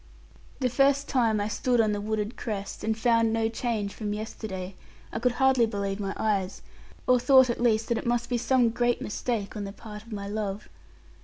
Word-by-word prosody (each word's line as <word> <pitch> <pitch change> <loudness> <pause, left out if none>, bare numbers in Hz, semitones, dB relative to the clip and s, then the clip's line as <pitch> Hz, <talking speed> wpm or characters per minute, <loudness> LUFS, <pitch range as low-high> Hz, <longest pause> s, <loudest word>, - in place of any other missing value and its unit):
The 255 - +3
first 275 +3 +2
time 230 -5 +2
I 205 - 0
stood 245 +3 0
on 215 -2 +3
the 205 0 -2
wooded 215 +2 -2
crest, 205 -4 -5
and 220 0 0
found 230 -1 +3
no 225 0 +1
change 225 -4 -2
from 210 -2 -3
yesterday, 200 -3 -6 0.4
I - - -2
could 245 +1 +1
hardly 265 -3 +4
believe 200 -2 -3
my 195 -1 -3
eyes, 200 -3 -1 0.4
or 250 -1 +4
thought 260 -1 +6
at 235 - -4
least 225 -2 +2
that 235 - +1
it - - -5
must 240 0 +1
be 245 -1 0
some 245 0 +3
great 240 +1 +1
mistake 215 -1 -3
on 210 - -4
the 195 - -5
part 210 0 -10
of 230 +2 -16
my 200 -1 -5
love. 205 -1 -4
225 Hz, 205 wpm, -27 LUFS, 205-240 Hz, 0.4 s, thought